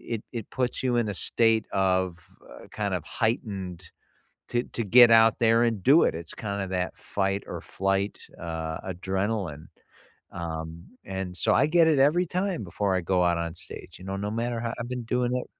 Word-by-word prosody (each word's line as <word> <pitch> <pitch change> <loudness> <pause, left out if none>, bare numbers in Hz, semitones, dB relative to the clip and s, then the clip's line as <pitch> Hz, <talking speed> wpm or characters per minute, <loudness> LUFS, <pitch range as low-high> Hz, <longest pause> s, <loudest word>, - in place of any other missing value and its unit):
it 110 - -7
it 115 -3 -5
puts 125 0 -1
you 125 -2 +1
in 115 -2 +1
a - - -2
state 115 +3 +3
of, 95 -2 +1 0.3
uh, - - -12
kind - - -2
of - - -2
heightened 100 - -3 0.6
to 120 0 0
to 115 - -4
get 120 +3 +8
out 115 -1 +6
there 115 0 +4
and 115 -5 0
do 145 +5 +6
it. - - +2
It's 80 0 -7
kinda 100 -2 -3
that 90 -1 -2
fight 100 0 -2
or - - -6
flight, 95 +1 -1 0.2
uh, 80 -1 -4
adrenaline, 95 -3 -3 0.7
um, 80 0 -6 0.2
and 95 -2 -5
so - - +2
I 135 - +4
get 165 +1 +4
it 150 -4 +3
every 155 +6 +4
time 180 - -2
before 95 +1 -1
I 95 - 0
go 90 +1 +1
out 85 -1 +2
on 85 -1 -3
stage, - - -9
you 95 - -11
know, 95 0 -3
no 105 +1 -3
matter 115 +1 -2
how 115 0 -3
I've 120 +1 -5
been 125 -1 -4
doing 125 +1 0
it 125 - -4
100 Hz, 195 wpm, -26 LUFS, 90-120 Hz, 0.7 s, get